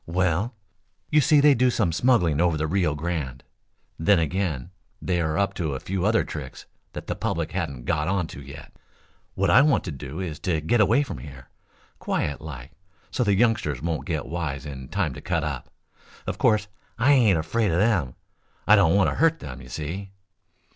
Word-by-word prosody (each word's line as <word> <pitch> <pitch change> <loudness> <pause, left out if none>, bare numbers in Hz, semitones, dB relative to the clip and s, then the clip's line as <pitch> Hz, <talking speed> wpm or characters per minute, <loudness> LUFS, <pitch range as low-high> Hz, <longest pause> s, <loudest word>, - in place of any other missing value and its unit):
"Well, 95 +6 0 0.6
you 150 - +5
see, 150 +1 +5
they 145 0 +7
do 130 0 +3
some 110 -8 +1
smuggling 85 - +2
over 85 -3 +2
the 75 - -1
Rio 85 -2 +1
Grande. 75 -5 -4 0.6
Then 100 +5 +4
again, 85 -2 -1 0.3
they 90 -2 -1
are 80 -1 -1
up 100 0 +1
to 80 -8 -2
a - - -4
few 95 +4 -2
other 110 +1 +3
tricks 70 -4 -8 0.3
that - - -7
the - - -2
public - - -2
hasn't 65 -3 -4
got 75 -2 0
on 95 -1 0
to 70 - -9
yet. 70 0 -11 0.6
What - - +2
I 125 - +7
want 150 0 +3
to 90 - -5
do 70 +2 -7
is 85 -4 -4
to 85 -3 0
get 105 +10 +2
away 115 +7 +4
from 135 - -7
here, 70 -4 -11 0.5
quiet 70 - -2
like, 70 -2 -8 0.4
so 125 - 0
the 100 -3 +2
youngsters 100 - +1
won't 80 +3 -3
get 80 -5 -2
wise 80 -4 -4
in 65 -3 -7
time - - -1
to - - -9
cut 85 -3 -1
up. 70 -5 -4 0.6
Of - - -4
course 105 -2 +3 0.3
I 120 +5 +4
ain't 110 -10 +4
afraid 105 +7 0
of 80 - +1
them. 95 - +1 0.5
I - - +7
don't 80 +3 +4
want 100 -1 +4
to - - -5
hurt 165 0 +3
them, 65 - -9
you 60 - -12
see." 90 +8 -5
85 Hz, 195 wpm, -25 LUFS, 75-100 Hz, 0.6 s, they